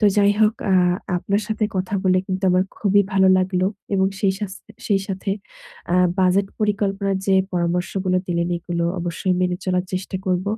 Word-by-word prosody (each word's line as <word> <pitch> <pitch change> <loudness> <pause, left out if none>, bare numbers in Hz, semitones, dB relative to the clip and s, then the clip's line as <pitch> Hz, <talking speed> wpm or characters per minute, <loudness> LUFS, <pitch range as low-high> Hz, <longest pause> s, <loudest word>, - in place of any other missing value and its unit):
তো 215 - +2
যাই 205 0 +5
হোক 215 +1 +4 0.2
আ - - +5 0.4
আপনার 200 +4 -1
সাথে 215 0 0
কথা 185 +2 -2
বলে 185 0 +4
কিন্তু 190 0 -2
আমার 180 +1 +3
খুবই 205 -1 +3
ভালো 190 -1 +4
লাগলো 185 0 +1 0.3
এবং 190 0 +3
সেই 195 -2 +3
সাস 200 -2 -4 0.3
সেই 200 -2 +2
সাথে 195 0 -3 0.9
বাজেট 190 +2 +3
আ - - -29
পরিকল্পনার 200 -2 0
যে 195 - +3 0.2
পরামর্শগুলো 180 +2 0
দিলেন 170 -1 -1
এগুলো 170 0 -3 0.2
অবশ্যই 175 +2 -1
মেনে 180 -1 +1
চলার 180 -1 0
চেষ্টা 185 +1 -3
করব। 185 0 0
190 Hz, 170 wpm, -21 LUFS, 180-200 Hz, 0.9 s, যাই